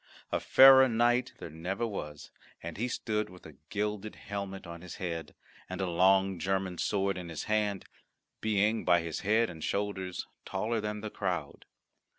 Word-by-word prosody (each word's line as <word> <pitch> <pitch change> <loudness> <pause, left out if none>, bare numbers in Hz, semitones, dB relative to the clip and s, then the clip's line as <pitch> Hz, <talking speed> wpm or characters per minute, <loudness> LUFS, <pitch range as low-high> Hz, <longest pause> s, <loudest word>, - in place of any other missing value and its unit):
A - - +1
fairer 130 0 +8
knight 120 +2 +2
there 85 - -8
never 90 +8 -3
was, 75 -9 -6 0.3
and 85 -1 -6
he 115 +5 -1
stood 110 -3 -2
with 90 -1 -15
a 80 -4 -12
gilded 105 0 -3
helmet 100 -1 -6
on 85 0 -8
his 90 -1 -8
head, 85 -3 -5 0.3
and 95 - -5
a 95 - 0
long 95 +1 +3
German 95 -2 -1
sword 100 -2 0
in 90 -2 -7
his 80 - -5
hand, 105 -3 0 0.5
being 110 +1 +1
by 85 -1 +4
his 85 -1 -4
head 110 +4 +2
and 80 -6 -8
shoulders 100 -3 -2 0.2
taller 110 +4 -2
than 105 0 -4
the 110 0 -5
crowd. 90 -8 -3
95 Hz, 165 wpm, -30 LUFS, 90-105 Hz, 0.5 s, fairer